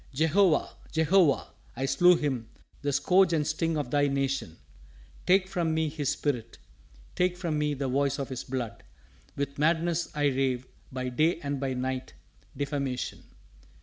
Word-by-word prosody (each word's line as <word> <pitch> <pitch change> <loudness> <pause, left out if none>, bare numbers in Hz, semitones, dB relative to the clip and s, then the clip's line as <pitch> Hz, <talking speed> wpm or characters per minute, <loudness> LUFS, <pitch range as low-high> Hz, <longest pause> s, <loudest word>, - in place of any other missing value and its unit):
Jehovah! 160 +3 +3 0.2
Jehovah! 160 -1 +3 0.2
I 130 +3 -1
slew 175 +7 +5
him, 130 -8 -2 0.3
the 145 - 0
scourge 180 +5 +4
and 155 -2 +1
sting 160 +1 0
of 145 -4 -3
Thy 145 0 +3
Nation. 135 - -1 0.7
Take 185 +1 +4
from 170 -4 -1
me 160 -1 +1
his 145 -2 -2
spirit, 125 -6 -2 0.6
take 180 0 +1
from 165 -4 -1
me 150 -1 0
the 135 0 -2
voice 140 +1 +1
of 140 -2 -4
his 130 -2 -5
blood. 120 -6 -4 0.5
With 140 0 -3
madness 165 +2 +1
I 145 -1 +1
rave 130 -2 0 0.3
by 130 -1 -3
day 155 +7 +2
and 140 -1 -3
by 135 -1 -2
night, 130 0 -3 0.4
defamation! 140 -2 -3
145 Hz, 150 wpm, -28 LUFS, 130-160 Hz, 0.7 s, slew